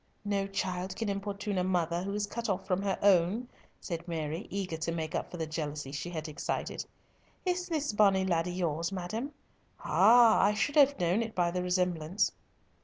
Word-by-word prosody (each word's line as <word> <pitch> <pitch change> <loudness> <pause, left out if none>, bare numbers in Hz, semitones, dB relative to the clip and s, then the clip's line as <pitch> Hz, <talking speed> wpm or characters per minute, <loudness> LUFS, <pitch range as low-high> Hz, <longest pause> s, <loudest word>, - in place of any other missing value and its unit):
"No 200 -1 0
child 190 -1 -3
can 225 -2 -2
importune 200 0 -2
a - - +1
mother 175 -2 0
who 200 +2 -3
is 210 0 0
cut 230 +2 -4
off 190 -1 -1
from 185 0 0
her 200 -1 0
own," 200 +5 +4 0.3
said 170 -1 -5
Mary, 160 0 -3
eager 190 -4 -3
to 165 +1 -2
make 160 -2 -3
up - - -2
for 175 - -8
the 160 - -2
jealousy 150 -3 -4
she 145 +4 -4
had 160 -3 -5
excited. 150 - -3 0.6
"Is 360 0 0
this 300 -7 -1
bonnie 195 -2 +4
laddie 175 -1 +1
yours, 170 -1 -1
madam? 215 +9 -4 0.5
Ah! 235 -1 +6
I 210 +1 +3
should 290 +7 0
have 280 -3 +5
known 180 +5 +2
it 225 -1 -4
by 175 -1 +2
the 180 +1 -1
resemblance." 180 -1 0
185 Hz, 185 wpm, -30 LUFS, 170-205 Hz, 0.6 s, Ah